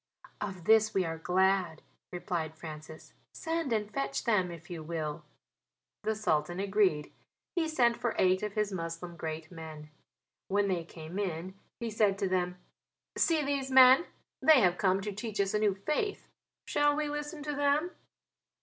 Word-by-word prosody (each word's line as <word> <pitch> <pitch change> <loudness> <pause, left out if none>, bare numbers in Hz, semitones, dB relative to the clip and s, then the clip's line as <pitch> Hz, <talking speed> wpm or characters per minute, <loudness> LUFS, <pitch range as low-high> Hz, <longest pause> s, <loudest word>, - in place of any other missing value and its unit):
"Of 190 -4 -5
this 215 +2 +4
we 190 -2 +2
are 165 0 -4
glad," 185 -1 +1 0.3
replied 175 -3 -3
Francis, 155 0 -10 0.2
"send 325 -5 -2
and 210 -2 -1
fetch 135 0 -2
them, 195 -6 +2
if 170 -1 -10
you 170 -3 -6
will." 155 -1 -4 0.8
The 220 +1 -1
Sultan 175 -4 0
agreed; 195 -6 +1 0.4
he 335 -2 +1
sent 240 -7 +2
for 235 - -2
eight 185 0 +3
of 210 -1 -3
his 210 -1 0
Moslem 170 -1 -5
great 160 0 -5
men. 155 -3 -9 0.6
When 200 +1 +1
they 175 -3 -1
came 165 +3 -8
in 185 -1 -3 0.3
he 235 -2 -3
said 210 -2 +2
to 195 -1 0
them: 180 -1 -1 0.6
"See 320 -3 +2
these 275 -1 -1
men, 260 +4 +7 0.3
they 310 -5 +7
have 180 -3 +2
come 190 -1 +2
to 210 +1 -3
teach 210 +1 -5
us 195 -1 +1
a 210 - +2
new 210 -2 +2
faith. 305 - -2 0.4
Shall 290 0 +2
we 305 0 -1
listen 295 +1 -5
to 295 0 -3
them?" 290 +4 +1
195 Hz, 165 wpm, -31 LUFS, 170-235 Hz, 0.8 s, men